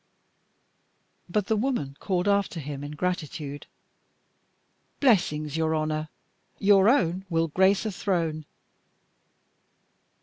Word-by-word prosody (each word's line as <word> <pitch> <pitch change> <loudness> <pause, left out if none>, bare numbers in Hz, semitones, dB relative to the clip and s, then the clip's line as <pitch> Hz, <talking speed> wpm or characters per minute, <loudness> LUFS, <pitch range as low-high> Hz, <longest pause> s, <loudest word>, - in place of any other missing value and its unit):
But 205 +2 0
the 220 - +1
woman 215 - -1
called 185 -1 -1
after 200 -4 +1
him 145 -1 -6
in 145 +1 -6
gratitude: 150 -4 -4 1.3
"Blessings 175 - +2
on - - -2
your 160 0 +1
honour. 155 0 -2 0.5
Your 200 0 +5
own 185 - +2
will 165 -1 +1
grace 190 +6 +3
a 215 - -1
throne." 165 -5 -1
175 Hz, 105 wpm, -26 LUFS, 155-200 Hz, 1.3 s, Your